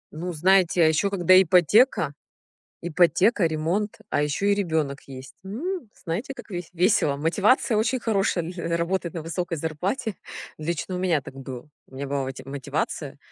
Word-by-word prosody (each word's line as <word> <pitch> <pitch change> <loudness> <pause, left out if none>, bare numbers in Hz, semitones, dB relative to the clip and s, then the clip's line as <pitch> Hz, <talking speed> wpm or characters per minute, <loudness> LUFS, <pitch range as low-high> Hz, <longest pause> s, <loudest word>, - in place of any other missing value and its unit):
Ну, 175 +3 -4
знаете, 180 +1 +3
а - - +6
ещё 160 +6 +2
когда 185 -1 +5
ипотека, 180 - +4 0.7
ипотека, 175 +4 +3
ремонт, 165 +7 -1
а 145 - +1
ещё 150 +7 -1
и 200 - +4
ребёнок 160 -8 -1
есть. 135 0 -10
М, 280 - -4
знаете, 190 +11 -3
как 270 - -12
вес 175 -3 -6
весело. 175 -5 +2
Мотивация 205 - +2
очень 240 +4 +1
хорошая 195 -6 0
на 170 -1 -3
работать 170 0 -1
на 165 - -5
высокой 170 0 -3
зарплате. 185 - -2 0.4
Лично 170 +4 -3
у - - -3
меня 175 -5 +1
так 135 - -11
было. 130 0 -8 0.2
У 130 - -17
меня 140 +1 -4
была 140 0 -1
мо 130 - -3 0.2
мотивация- 135 -1 -4
175 Hz, 160 wpm, -25 LUFS, 155-195 Hz, 0.7 s, а